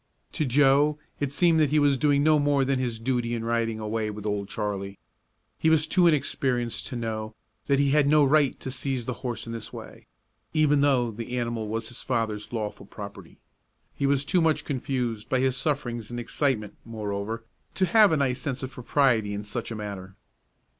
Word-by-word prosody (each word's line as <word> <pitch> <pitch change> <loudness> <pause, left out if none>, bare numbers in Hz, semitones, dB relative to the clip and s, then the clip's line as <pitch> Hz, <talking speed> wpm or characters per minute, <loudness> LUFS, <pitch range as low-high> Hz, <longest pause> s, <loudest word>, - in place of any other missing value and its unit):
To 155 - -1
Joe 140 +3 +4 0.2
it 145 -2 -1
seemed 165 +2 +4
that 150 -3 +3
he 155 - +2
was 145 -2 +4
doing 145 +1 +2
no 155 0 +5
more 145 -1 +2
than 135 -1 +1
his 120 -3 -2
duty 120 0 -1
in 115 -1 -4
riding 115 -1 0
away 110 0 -2
with 105 0 -7
Old 105 -1 -2
Charlie. 100 -1 -4 0.6
He 160 - +3
was 160 -1 +4
too 175 +2 +4
inexperienced 130 -5 0
to 130 - -6
know 110 -2 -4 0.3
that 140 -1 +3
he 140 0 +2
had 150 -1 +4
no 150 0 +5
right 145 -1 +3
to 130 - -4
seize 130 -2 -2
the 125 - -2
horse 120 -3 -4
in 115 - -6
this 115 -2 -6
way, - - -11 0.5
even 145 -2 +4
though 130 -5 +3
the 115 +3 -5
animal 115 -2 -2
was 110 +1 -3
his 120 - -6
father's 110 -4 -2
lawful 110 -3 -4
property. 100 -4 -10 0.6
He 140 - -1
was 140 0 +2
too 180 - +2
much 155 -2 +1
confused 125 -5 -3
by 130 - +2
his 130 0 +1
sufferings 125 -5 -2
and 120 0 -5
excitement, 115 -2 -1
moreover, 110 0 -4 0.3
to 190 - +3
have 210 +2 +5
a 160 - +3
nice 130 -3 0
sense 135 -3 -3
of 130 - -4
propriety 120 -5 +1
in 100 - -4
such 105 +3 -4
a 115 - -5
matter. 100 -3 -7
125 Hz, 195 wpm, -26 LUFS, 110-140 Hz, 0.6 s, no